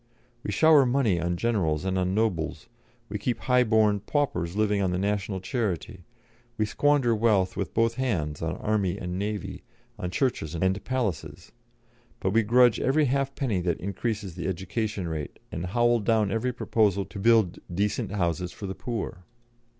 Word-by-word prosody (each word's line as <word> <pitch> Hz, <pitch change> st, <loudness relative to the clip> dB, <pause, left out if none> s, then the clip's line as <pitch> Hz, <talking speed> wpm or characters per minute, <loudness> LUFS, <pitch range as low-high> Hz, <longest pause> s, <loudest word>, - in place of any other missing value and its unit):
We 105 Hz, -, -4 dB
shower 155 Hz, +6 st, +6 dB
money 120 Hz, -9 st, +2 dB
on 85 Hz, +1 st, -1 dB
generals 90 Hz, -8 st, 0 dB
and 95 Hz, 0 st, 0 dB
on 90 Hz, +1 st, 0 dB
nobles, 105 Hz, -8 st, -1 dB, 0.4 s
we 105 Hz, +1 st, -4 dB
keep 120 Hz, +4 st, -1 dB
high 125 Hz, -1 st, +3 dB
born 110 Hz, -3 st, +3 dB
paupers 100 Hz, -, -1 dB
living 105 Hz, -1 st, +1 dB
on 95 Hz, -, +1 dB
the 90 Hz, -, -1 dB
national 100 Hz, 0 st, -1 dB
charity, 95 Hz, -4 st, -3 dB, 0.5 s
we 110 Hz, -, +2 dB
squander 140 Hz, +1 st, +2 dB
wealth 105 Hz, -4 st, +2 dB
with -, -, -4 dB
both 115 Hz, 0 st, +3 dB
hands 80 Hz, -, -1 dB
on 80 Hz, +2 st, -2 dB
army 100 Hz, -3 st, 0 dB
and 90 Hz, -1 st, -4 dB
navy, 105 Hz, -2 st, -4 dB, 0.4 s
on 90 Hz, -, -3 dB
churches 90 Hz, -, -1 dB
and 95 Hz, +4 st, 0 dB
palaces; 120 Hz, -, -3 dB, 0.7 s
but 95 Hz, -, 0 dB
we 115 Hz, +3 st, +4 dB
grudge 120 Hz, 0 st, +4 dB
every 150 Hz, +3 st, +2 dB
halfpenny 135 Hz, -6 st, 0 dB
that 85 Hz, -2 st, -1 dB
increases 100 Hz, 0 st, -3 dB
the 85 Hz, 0 st, -4 dB
education 95 Hz, +1 st, -3 dB
rate 80 Hz, -3 st, -5 dB
and 85 Hz, +3 st, -4 dB
howl 120 Hz, +4 st, +3 dB
down 110 Hz, -2 st, +1 dB
every 115 Hz, +4 st, 0 dB
proposal 105 Hz, -4 st, +1 dB
to 100 Hz, +1 st, -9 dB
build 110 Hz, -4 st, +3 dB
decent 105 Hz, +3 st, -1 dB
houses 90 Hz, -2 st, -1 dB
for 100 Hz, -, -8 dB
the 95 Hz, -, -3 dB
poor. 110 Hz, -5 st, -5 dB
105 Hz, 165 wpm, -27 LUFS, 90-115 Hz, 0.7 s, shower